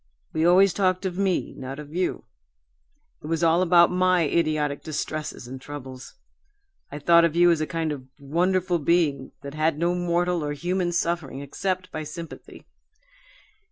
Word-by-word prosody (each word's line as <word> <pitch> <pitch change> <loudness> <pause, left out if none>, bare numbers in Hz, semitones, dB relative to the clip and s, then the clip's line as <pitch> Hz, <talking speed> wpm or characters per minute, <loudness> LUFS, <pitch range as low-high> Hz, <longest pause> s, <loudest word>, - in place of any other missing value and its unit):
We 160 +1 +2
always 190 +2 +5
talked 185 -1 +1
of 185 -2 -2
me, 190 -2 0
not 135 +1 -7
of 150 0 -10
you. 180 +1 -1 1.0
It - - -8
was 165 +1 -1
all 165 +1 +4
about 175 -1 +5
my 185 -1 +3
idiotic 155 -2 0
distresses 155 -3 -5
and 130 +1 -8
troubles. 130 -3 -9 0.8
I 145 - -5
thought 170 +3 +5
of 165 -1 +1
you 175 0 +6
as 165 -2 +1
a 155 - -1
kind 165 -2 -2
of 130 -3 -7
wonderful 175 +5 0
being 145 -4 +1
that 140 0 -7
had 155 0 0
no 170 +2 +1
mortal 175 -1 0
or 145 0 -2
human 175 +3 -1
suffering 170 -5 -2
except 185 +6 -3
by 155 - -4
sympathy. 165 +2 -9
165 Hz, 160 wpm, -25 LUFS, 150-175 Hz, 1.0 s, you